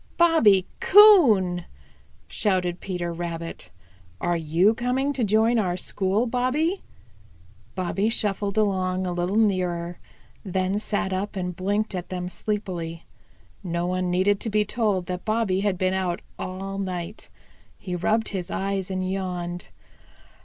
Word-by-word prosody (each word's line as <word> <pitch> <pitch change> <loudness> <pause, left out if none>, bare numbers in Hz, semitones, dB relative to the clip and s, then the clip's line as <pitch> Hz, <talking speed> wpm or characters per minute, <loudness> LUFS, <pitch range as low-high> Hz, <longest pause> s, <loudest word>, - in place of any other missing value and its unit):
"Bobby 230 - +5
Coon!" 240 - +6 0.6
shouted 180 -3 -1
Peter 175 -3 -4
Rabbit. 165 - -6 0.5
"Are 175 0 0
you 165 +6 +3
coming 255 +4 -1
to 260 - -1
join 220 +3 +3
our 180 -4 0
school, 195 +5 0
Bobby?" 255 +10 0 0.9
Bobby 190 +3 0
shuffled 205 -2 -1
along 185 -3 +1
a 180 - -2
little 175 +3 -1
nearer, 180 -5 0 0.4
then 190 +1 -1
sat 205 -2 -2
up 200 +3 -3
and 180 -2 -3
blinked 205 +4 -1
at 180 -2 -5
them 180 -1 -4
sleepily. 180 -6 -4 0.6
No 170 -1 -2
one 185 0 -1
needed 190 +3 +2
to 225 - -3
be 210 0 +2
told 205 -5 0
that 180 0 -5
Bobby 215 -4 0
had 200 -2 0
been 185 +1 +1
out 185 -2 -1 0.2
all 195 +1 -5
night. 185 +1 -5 0.5
He 180 -3 -5
rubbed 220 +6 +1
his 190 -2 -4
eyes 195 -1 -2
and 185 -1 -2
yawned. 180 -2 -4
190 Hz, 135 wpm, -25 LUFS, 180-215 Hz, 0.9 s, Coon